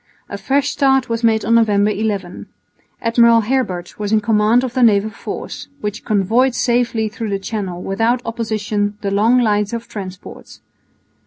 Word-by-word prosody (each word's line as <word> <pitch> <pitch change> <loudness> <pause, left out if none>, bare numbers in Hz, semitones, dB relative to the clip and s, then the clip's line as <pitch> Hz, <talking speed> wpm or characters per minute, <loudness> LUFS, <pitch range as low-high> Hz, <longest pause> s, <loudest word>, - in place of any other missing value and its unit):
A 200 - -5
fresh 275 +7 0
start 270 -2 +2
was 230 0 -2
made 220 -1 +2
on 230 - +2
November 210 -2 +3
11. 200 -4 -3 0.6
Admiral 230 0 +4
Herbert 210 -8 -2
was 205 -1 -3
in 220 - +4
command 215 +3 +2
of 250 -2 -4
the 260 - 0
naval 215 -2 +3
force, 200 - -7
which 210 -3 -5
convoyed 225 +5 +1
safely 235 -3 0
through 215 +1 -5
the 200 - -1
Channel 195 -3 -5
without 225 +5 0
opposition 215 -3 -2
the 200 - -2
long 225 +5 +3
lines 210 -2 +1
of 235 0 -5
transports. 190 -2 -9
220 Hz, 160 wpm, -18 LUFS, 205-235 Hz, 0.6 s, Admiral